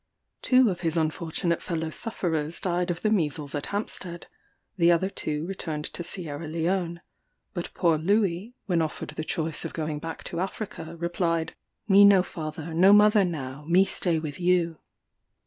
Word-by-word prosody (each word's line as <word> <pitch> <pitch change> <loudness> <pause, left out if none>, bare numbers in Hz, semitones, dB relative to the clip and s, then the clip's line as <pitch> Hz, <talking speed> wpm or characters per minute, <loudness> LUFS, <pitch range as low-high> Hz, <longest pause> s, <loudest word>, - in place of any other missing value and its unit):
Two 255 -4 +4
of 175 - -5
his 165 -1 -1
unfortunate 165 +1 -1
fellow 160 -2 -3
sufferers 165 -7 -2
died 180 0 -1
of 175 0 -3
the 215 - +2
measles 150 -7 0
at 145 -1 -3
Hampstead; 185 -4 -3 0.5
the 175 -2 +4
other 185 +3 +2
two 150 -3 -3
returned 160 -5 -4
to 175 - -5
Sierra 165 -3 -2
Leone; 170 +2 -1 0.5
but 175 -3 -4
poor 165 -3 +2
Louis, 200 +4 0
when 175 -5 +1
offered 155 -1 -3
the 155 - -5
choice 160 0 -1
of - - -5
going 155 -2 -3
back 165 +1 -6
to 170 - -5
Africa, 190 -3 -5
replied, 170 -1 -1 0.3
"Me 200 0 +7
no 200 -2 +7
father, 160 -1 -6
no 185 +5 +6
mother 210 0 +6
now; 145 -5 -4
me 180 +4 +5
stay 175 -3 0
with 155 -2 -5
you." 175 -2 +1
170 Hz, 165 wpm, -26 LUFS, 160-185 Hz, 0.5 s, Me